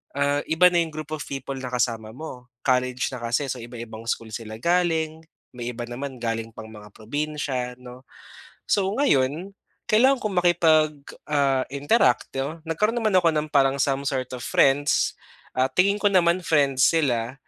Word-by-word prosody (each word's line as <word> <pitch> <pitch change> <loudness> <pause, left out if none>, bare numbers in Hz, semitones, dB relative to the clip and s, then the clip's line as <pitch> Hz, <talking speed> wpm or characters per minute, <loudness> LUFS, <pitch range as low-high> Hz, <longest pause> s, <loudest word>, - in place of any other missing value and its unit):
ah, 140 0 +1
iba 180 +3 +6
na 175 - 0
'yong 160 -2 -4
group 155 -1 -7
of 150 - -4
people 135 0 -5
na 130 -1 -5
kasama 115 -3 -1
mo, 125 -4 -9 0.2
college 125 -1 +1
na - - -4
kasi, 125 +4 -1
so 130 - -4
iba-ibang 115 -1 -9
school 115 -1 -2
sila 110 -1 -6
galing, 165 -3 +1 0.4
may 120 0 -4
iba 120 0 -5
naman 130 +1 -6
galing 115 -1 -2
pang 110 -1 -10
mga 105 -1 -12
probinsiya, 135 0 -3
'no. 125 +1 -12 0.6
So 195 -1 +2
ngayon, 175 - +1 0.3
kailangan 255 +4 +4
ko 215 - 0
makipag, 165 -4 +3 0.4
ah, 140 -3 +2
interact, 140 - +2
‘no, 150 +5 -3
nagkaroon 210 +8 0
naman 215 -4 +2
ako 170 - +3
ng 150 0 -1
parang 135 -1 +3
some 135 +1 0
sort 130 -3 -2
of 120 - -9
friends. 140 +1 +2 0.4
Ah, 130 +1 +3
tingin 200 +7 +2
ko 205 - +1
naman 180 -2 +3
friends 140 -5 +3
sila, 130 -7 0
140 Hz, 170 wpm, -24 LUFS, 125-165 Hz, 0.6 s, iba